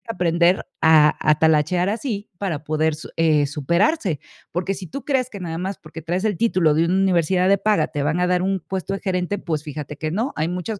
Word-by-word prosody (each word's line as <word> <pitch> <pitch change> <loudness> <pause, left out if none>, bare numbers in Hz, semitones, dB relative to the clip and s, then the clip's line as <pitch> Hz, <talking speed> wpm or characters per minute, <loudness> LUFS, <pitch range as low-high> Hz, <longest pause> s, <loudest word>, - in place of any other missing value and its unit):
aprender 175 +1 +2 0.2
a 155 -2 +6
a 155 0 +4
talachear 160 +3 +3
así 215 -1 -3
para 165 -7 -3
poder, 155 0 0 0.2
eh, 155 -3 +3
superarse". 170 - 0 0.3
Porque 180 +3 -1
si 185 -2 -8
tú 275 - -7
crees 260 -3 0
que 200 - -9
nada 165 -3 -4
más 190 +1 -3
porque 160 +1 -10
traes 175 +5 -2
el 210 -4 +1
título 180 -9 +2
de 165 +2 +2
una 180 +2 +1
universidad 185 -1 +2
de 200 0 +4
paga, 215 -1 +2
te 145 - -4
van 160 +5 0
a 180 - +2
dar 180 0 +2
un 190 0 0
puesto 190 +3 -4
de - - -6
gerente, 185 +1 -1
pues 160 -5 -3
fíjate 150 -1 -7
que 155 - -3
no, 225 +9 -1
hay 155 +2 -1
muchos 180 +4 -4
180 Hz, 215 wpm, -22 LUFS, 155-195 Hz, 0.3 s, a